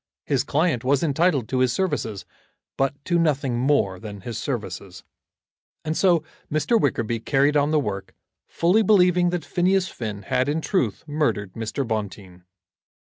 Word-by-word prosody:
His 135 Hz, -4 st, +1 dB
client 145 Hz, -3 st, 0 dB
was 135 Hz, +3 st, +2 dB
entitled 150 Hz, -4 st, +1 dB
to 130 Hz, -, 0 dB
his 130 Hz, -1 st, +3 dB
services, 115 Hz, -, -2 dB, 0.5 s
but 135 Hz, 0 st, 0 dB
to 175 Hz, -1 st, +2 dB
nothing 140 Hz, -6 st, +1 dB
more 125 Hz, -9 st, +1 dB
than 105 Hz, -2 st, -8 dB
his 115 Hz, +4 st, -6 dB
services. 95 Hz, -7 st, -5 dB, 0.8 s
And 155 Hz, +1 st, -1 dB
so 175 Hz, -4 st, +3 dB, 0.3 s
Mr. 155 Hz, +10 st, +2 dB
Wickerby 115 Hz, -4 st, 0 dB
carried 140 Hz, +5 st, +2 dB
on 145 Hz, 0 st, +3 dB
the 155 Hz, 0 st, +3 dB
work, 100 Hz, -8 st, -4 dB, 0.3 s
fully 180 Hz, +6 st, +2 dB
believing 180 Hz, -4 st, +4 dB
that 175 Hz, -3 st, -3 dB
Phineas 185 Hz, +1 st, +1 dB
Finn 105 Hz, -4 st, -6 dB
had 130 Hz, +5 st, 0 dB
in 150 Hz, +2 st, 0 dB
truth 155 Hz, -, -1 dB
murdered 145 Hz, -11 st, -1 dB
Mr. 115 Hz, +4 st, -3 dB
Bonteen. 100 Hz, -5 st, -5 dB
140 Hz, 150 wpm, -23 LUFS, 110-165 Hz, 0.8 s, believing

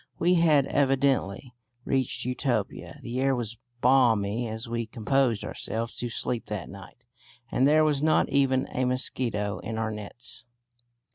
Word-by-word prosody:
We 175 Hz, +2 st, +3 dB
had 160 Hz, -5 st, +4 dB
evidently 135 Hz, -5 st, +1 dB, 0.3 s
reached 130 Hz, -3 st, 0 dB
Utopia. 125 Hz, -4 st, -2 dB
The 120 Hz, +2 st, -4 dB
air 135 Hz, 0 st, +2 dB
was 115 Hz, -2 st, -4 dB, 0.2 s
balmy 120 Hz, -3 st, +3 dB
as 110 Hz, +2 st, -5 dB
we 115 Hz, -1 st, -3 dB
composed 120 Hz, 0 st, 0 dB
ourselves 115 Hz, +1 st, -4 dB
to 120 Hz, -, -3 dB
sleep 115 Hz, +1 st, -3 dB
that 105 Hz, -4 st, -5 dB
night, 100 Hz, +5 st, -13 dB, 0.5 s
and 130 Hz, -, +3 dB
there 155 Hz, +1 st, +5 dB
was 145 Hz, -2 st, +1 dB
not 155 Hz, +1 st, +3 dB
even 135 Hz, -1 st, +2 dB
a 130 Hz, -, 0 dB
mosquito 120 Hz, -5 st, 0 dB
in 110 Hz, +1 st, -5 dB
our 110 Hz, 0 st, -1 dB
nets. 105 Hz, +2 st, -6 dB
125 Hz, 145 wpm, -27 LUFS, 110-135 Hz, 0.5 s, there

